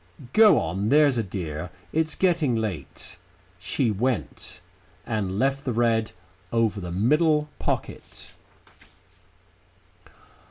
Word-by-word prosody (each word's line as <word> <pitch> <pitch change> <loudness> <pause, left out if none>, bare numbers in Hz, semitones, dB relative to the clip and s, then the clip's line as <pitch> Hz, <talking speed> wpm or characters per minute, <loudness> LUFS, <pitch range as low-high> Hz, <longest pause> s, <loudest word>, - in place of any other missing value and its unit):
Go 215 -2 +7
on, 95 +6 -1
there's 145 -3 +4
a - - 0
dear. 90 -4 -5 0.2
It's 160 0 0
getting 170 -9 +1
late." 105 -10 -5 0.4
She 120 -5 0
went, 115 -2 -3 0.5
and 100 -5 -2
left 135 +4 0
the 125 - -2
red 115 -1 +1 0.4
over 115 -3 +1
the 90 -1 -6
middle 150 - +2
pocket. - - -5
115 Hz, 105 wpm, -25 LUFS, 100-145 Hz, 0.5 s, Go